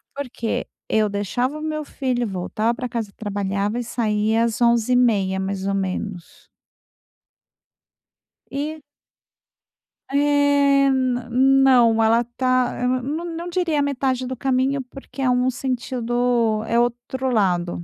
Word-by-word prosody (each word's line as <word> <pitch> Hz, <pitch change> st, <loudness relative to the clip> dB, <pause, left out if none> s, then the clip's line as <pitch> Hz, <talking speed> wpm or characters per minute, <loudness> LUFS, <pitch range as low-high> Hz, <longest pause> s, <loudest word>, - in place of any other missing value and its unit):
Porque 250 Hz, -5 st, -3 dB, 0.2 s
eu 215 Hz, -1 st, +2 dB
deixava 245 Hz, +8 st, -2 dB
o -, -, -8 dB
meu 310 Hz, 0 st, -3 dB
filho, 255 Hz, -4 st, -2 dB
voltava 215 Hz, +3 st, -1 dB
pra 250 Hz, +1 st, -4 dB
casa, 225 Hz, -4 st, -4 dB
trabalhava 205 Hz, +1 st, -2 dB
e -, -, -2 dB
saía 220 Hz, -1 st, 0 dB
às 230 Hz, 0 st, -3 dB
11h30, 235 Hz, -5 st, +3 dB
mais 190 Hz, 0 st, -3 dB
ou 200 Hz, -, 0 dB
menos. 190 Hz, -1 st, -5 dB, 2.0 s
E 305 Hz, +3 st, -4 dB, 1.3 s
é, 285 Hz, -1 st, +3 dB
na 255 Hz, -2 st, -1 dB
não, 255 Hz, -3 st, +5 dB
ela 225 Hz, +1 st, +4 dB
está 250 Hz, +1 st, 0 dB
não 300 Hz, +7 st, -4 dB
não 340 Hz, +1 st, -5 dB
diria 340 Hz, -4 st, 0 dB
metade 260 Hz, -2 st, -1 dB
do 260 Hz, -, -4 dB
caminho, 265 Hz, +2 st, 0 dB
porque 270 Hz, +2 st, -13 dB
é 260 Hz, -, +2 dB
um 250 Hz, +1 st, +2 dB
sentido, 245 Hz, -3 st, -1 dB
é 235 Hz, -, +2 dB
outro 245 Hz, +2 st, -1 dB
lado, 180 Hz, -6 st, 0 dB
245 Hz, 120 wpm, -22 LUFS, 220-270 Hz, 2.0 s, não